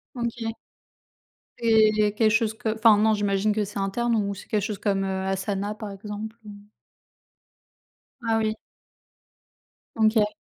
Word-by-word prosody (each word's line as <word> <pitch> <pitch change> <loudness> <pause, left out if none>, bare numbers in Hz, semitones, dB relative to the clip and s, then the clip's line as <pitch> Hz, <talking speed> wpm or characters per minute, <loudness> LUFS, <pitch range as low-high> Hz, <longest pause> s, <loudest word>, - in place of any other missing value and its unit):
OK. 235 -2 -3 1.0
C'est 215 -2 +3
quelque 220 - +4
chose 215 0 +2
que 220 0 -3
enfin 220 -1 +6
non, 220 +1 +3
j'imagine 205 0 +1
que 215 0 0
c'est 205 0 -6
interne 235 +5 0
ou 200 -2 0
c'est 190 - -12
quelque 210 - 0
chose 210 0 -3
comme, 195 -1 0
heu, 190 0 -2
Asana, 195 +1 -2
par 215 -1 -7
exemple 210 +2 -7
ou 210 - -8 1.7
Ah 225 -1 +1
oui. 220 -1 0 1.4
OK. 215 -1 +3
215 Hz, 140 wpm, -25 LUFS, 205-220 Hz, 1.7 s, enfin